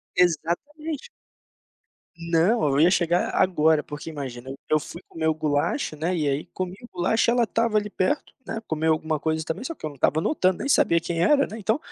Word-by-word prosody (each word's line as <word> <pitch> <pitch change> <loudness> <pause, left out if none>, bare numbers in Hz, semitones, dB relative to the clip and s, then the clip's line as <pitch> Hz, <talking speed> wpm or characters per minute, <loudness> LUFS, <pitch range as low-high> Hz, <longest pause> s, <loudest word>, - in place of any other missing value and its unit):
Exatamente. 275 - -1 1.1
Não, 170 +5 +2
eu 140 +1 +1
ia 165 +3 +6
chegar 175 -1 +2
agora, 160 -4 +3
porque 150 +2 -7
imagina, 130 -4 -7 0.2
eu 155 - +4
fui 170 +3 -9
comer 160 -1 -3
o 160 - +3
gulacho, 155 - -1
né, 170 +4 -1
e 150 -4 0
aí 140 +2 -1
comi 185 -1 -3
o 240 - -11
gulacho, 185 +6 +1
ela 240 0 +3
estava 230 0 +1
ali 210 0 -1
perto, 245 +9 -1
né, 225 0 -4
comeu 160 0 +1
alguma 155 0 -2
coisa 160 +1 -1
também, 175 +10 -4
só 330 - -4
que - - -8
eu - - -2
não 145 - -12
estava 150 +4 +2
notando, 185 - +1
nem 280 - -3
sabia 170 -10 +4
quem 165 0 -2
era, 280 - +4
né, 220 - -8
então, 220 +3 +1
170 Hz, 200 wpm, -25 LUFS, 155-220 Hz, 1.1 s, ia